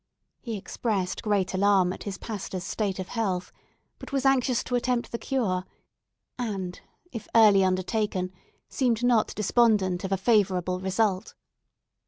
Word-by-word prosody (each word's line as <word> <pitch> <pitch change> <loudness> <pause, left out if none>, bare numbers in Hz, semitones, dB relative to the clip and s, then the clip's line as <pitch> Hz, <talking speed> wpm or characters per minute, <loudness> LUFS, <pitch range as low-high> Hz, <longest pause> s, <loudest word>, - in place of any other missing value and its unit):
He 230 -4 -5
expressed 195 -2 -2
great 205 -4 0
alarm 190 -1 +3
at - - -10
his 200 -2 -4
pastor's 195 -4 -5
state 200 -1 -2
of 185 -1 -5
health, 195 -6 -2 0.5
but - - -10
was 275 -1 -1
anxious 260 -2 +3
to 250 - -6
attempt 245 0 0
the 235 - -3
cure, 210 -9 -1 0.8
and, 195 -6 -4 0.3
if 225 -4 -7
early 210 -4 +7
undertaken, 185 0 0 0.4
seemed 245 -3 0
not 240 -3 +2
despondent 210 -4 +2
of 190 - -4
a 195 - +2
favourable 185 -4 +2
result. 190 +1 0
205 Hz, 140 wpm, -27 LUFS, 185-230 Hz, 0.8 s, early